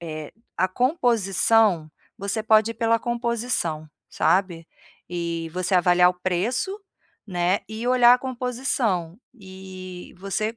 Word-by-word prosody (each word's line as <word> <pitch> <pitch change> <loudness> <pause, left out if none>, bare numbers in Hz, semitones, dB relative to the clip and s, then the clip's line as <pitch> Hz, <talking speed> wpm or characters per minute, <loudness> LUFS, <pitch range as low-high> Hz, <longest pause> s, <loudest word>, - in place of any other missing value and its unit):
eh, 155 -3 -7 0.2
a 185 - +2
composição, 225 - +2 0.3
você 200 +3 -2
pode 220 +1 +3
ir - - -23
pela 230 0 +1
composição, 235 -10 -2 0.2
sabe. 180 -3 0 0.4
E 170 -2 -3
você 185 +1 -1
avaliar 180 0 +5
o - - -8
preço, 230 - -1 0.5
né, 180 0 0
e 220 +2 -5
olhar 245 -1 +6
a - - 0
composição, 245 -8 -2 0.2
e 190 -3 -10
você 215 +4 -3
195 Hz, 120 wpm, -24 LUFS, 180-235 Hz, 0.5 s, olhar